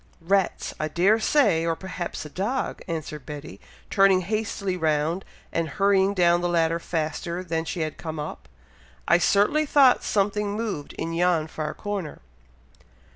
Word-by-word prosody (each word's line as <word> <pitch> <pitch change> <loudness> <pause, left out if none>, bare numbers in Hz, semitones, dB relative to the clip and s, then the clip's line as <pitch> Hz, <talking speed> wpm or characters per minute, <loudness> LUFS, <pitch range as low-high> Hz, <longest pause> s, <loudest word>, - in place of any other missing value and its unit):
"Rats, 190 +3 0
I 155 - 0
dare 190 +8 +3
say! 215 - +3
or 165 0 0
perhaps 180 -3 -6
a - - -7
dog!" 210 - -2
answered 155 -4 -5
Betty, 145 -9 -9 0.3
turning 195 -1 +5
hastily 200 -1 -2
round, 160 +2 0 0.3
and 165 -1 0
hurrying 195 +3 +2
down 175 -1 +4
the 175 - 0
ladder 165 -1 +2
faster 170 +2 -3
than 165 -2 -2
she 170 +1 -3
had 155 -1 -3
come 160 -1 -5
up. 150 - -7 0.6
"I - - +5
certainly 210 - +3
thought 275 -3 +5
something 205 0 0
moved 210 -10 -4
in 165 0 -4
yon 170 -2 +2
far 155 -1 -5
corner." 200 -7 -5
175 Hz, 150 wpm, -25 LUFS, 160-200 Hz, 0.6 s, turning